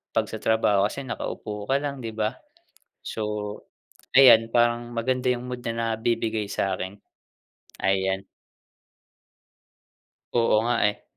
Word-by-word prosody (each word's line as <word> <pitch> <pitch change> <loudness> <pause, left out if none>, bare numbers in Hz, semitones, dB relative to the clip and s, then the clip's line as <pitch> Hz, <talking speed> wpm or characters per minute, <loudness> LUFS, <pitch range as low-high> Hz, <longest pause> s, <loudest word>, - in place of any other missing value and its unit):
'pag - - +2
sa - - -5
trabaho 105 -3 +3
kasi 140 +5 -6
nakaupo 105 -4 -5
ka 135 - +3
lang, 140 -2 -3
'di 115 -2 -6
ba? 110 +2 -1 0.7
So, 105 -1 -4 0.5
ayan, 115 -4 +8
parang 120 0 +2
maganda 125 +2 0
yung 125 +1 -5
mood 125 -1 -5
na 115 -1 -1
nabibigay 110 -2 -1
sa 95 -1 0
akin, 95 +2 -6 0.9
ayan. 95 0 +1 2.1
Oo 115 -2 +3
nga, 120 +1 +1
eh. 105 - -4
115 Hz, 125 wpm, -25 LUFS, 105-120 Hz, 2.1 s, ayan